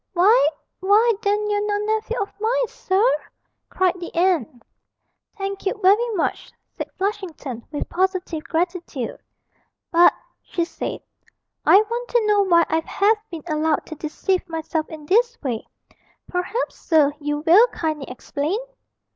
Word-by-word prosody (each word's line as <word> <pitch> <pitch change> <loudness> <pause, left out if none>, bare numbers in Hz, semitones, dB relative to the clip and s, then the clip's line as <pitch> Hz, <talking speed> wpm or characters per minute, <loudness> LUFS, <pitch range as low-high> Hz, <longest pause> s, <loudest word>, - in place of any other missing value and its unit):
'Why 425 +8 +5 0.3
why 425 +5 +4
then 415 +1 +1
you're 415 0 0
no 410 -1 +1
nephew 435 +3 -1
of 400 - -3
mine, - - +1
sir!' 410 +5 +1 0.6
cried 370 -1 +1
the 345 - -7
aunt. 325 -9 +1 0.7
'Thank 395 0 -4
you - - 0
very 420 +5 +4
much,' 345 - -2 0.2
said - - -5
Flushington, 360 - -4
with 295 - -3
positive 365 -3 -1
gratitude. 340 -7 -2 0.8
'But,' 345 +1 +6 0.3
she 340 -2 -2
said, - - -5 0.7
'I 395 - +8
want 475 +3 -4
to 475 -2 +2
know 415 -1 +4
why 340 -4 +4
I 320 - +1
have 420 +6 +2
been 330 -3 -7
allowed 310 -1 0
to 315 - -8
deceive 355 +5 -2
myself 320 -1 -3
in 310 -2 -9
this 465 +7 +2
way. 240 -5 -3 0.6
Perhaps, 370 +7 -3
sir, 300 -4 +3
you 295 0 -2
will 390 +9 +7
kindly 310 - -3
explain?' 285 - -3
370 Hz, 140 wpm, -22 LUFS, 320-420 Hz, 0.8 s, I